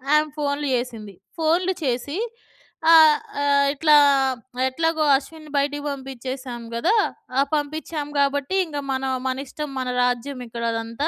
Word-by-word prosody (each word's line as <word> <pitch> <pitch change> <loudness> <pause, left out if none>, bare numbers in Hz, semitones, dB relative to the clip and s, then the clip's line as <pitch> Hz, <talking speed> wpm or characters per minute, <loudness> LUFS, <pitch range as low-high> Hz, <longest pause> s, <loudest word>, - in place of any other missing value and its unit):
ఆ‌మే 305 0 +3
ఫోన్‌లు 290 0 -1
జెసింది. 225 -5 -5 0.2
ఫోన్‌లు 345 +4 +2
చేసి 260 +4 -2 0.7
ఆహ్, 315 -2 +8 0.2
ఆహ్, 280 0 +3
"ఇట్లా 300 +1 +4 0.7
ఎట్లాగో 325 +3 0
అశ్విన్‌ని 310 +2 -11
బయటికి 285 +1 0
బంపిచ్చేసాం 260 -2 -6
గదా! 330 - +2 0.4
ఆ! - - +5 0.2
పంపిచ్చాం 300 0 -3
గాబట్టి 280 +4 +1
ఇంగ 305 -3 -7
మనొ 265 0 -1 0.2
మన 260 0 -2
ఇష్టం 300 +2 -6
మన 255 - -3 0.2
రాజ్యం 250 +2 -1
ఇక్కడ 235 0 -6
అదంతా. 230 +5 -3
285 Hz, 130 wpm, -23 LUFS, 255-305 Hz, 0.7 s, ఆహ్